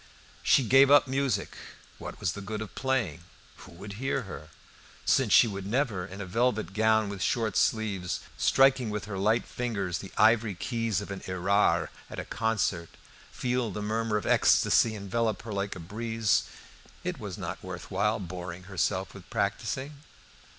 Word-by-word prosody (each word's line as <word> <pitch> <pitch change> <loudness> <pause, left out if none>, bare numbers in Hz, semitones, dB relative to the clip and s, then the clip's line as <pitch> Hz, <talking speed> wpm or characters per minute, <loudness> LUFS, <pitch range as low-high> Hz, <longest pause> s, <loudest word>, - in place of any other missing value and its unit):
She 135 - +4
gave 135 +4 +6
up 145 0 +6
music. 135 -3 -1 0.4
What - - -8
was 85 - 0
the 100 - -7
good 105 +2 -5
of 105 - -11
playing? 120 - -1 0.4
Who 95 - -13
would 100 +4 -9
hear 135 -1 0
her? 80 -7 -9 0.6
Since - - +3
she - - +7
could 100 -2 -5
never, 115 -5 0
in 95 0 -9
a 100 - -4
velvet 110 0 0
gown 110 0 +3
with 100 -1 -6
short 110 -2 0
sleeves, 100 -5 0
striking 135 -3 +4
with 105 -1 -3
her 100 -2 -5
light 110 +4 +2
fingers 100 -8 -3
the 95 - -9
ivory 110 -3 +4
keys 115 +2 -1
of 100 - -7
an 95 - -5
Erard 95 +3 +2 0.2
at - - -8
a - - -4
concert, 110 -7 -1 0.4
feel 125 -2 -1
the 105 +1 -5
murmur 110 0 0
of 105 - -4
ecstasy 110 -1 +4
envelop 105 +1 -1
her 110 -2 -6
like 100 0 -2
a - - -8
breeze, 110 +4 0 0.6
it - - -3
was - - -6
not - - -5
worth - - -8
while 105 +1 +1
boring 90 -1 -7
herself 95 0 -1
with - - -13
practicing. 140 +3 -2
105 Hz, 170 wpm, -28 LUFS, 95-115 Hz, 0.6 s, she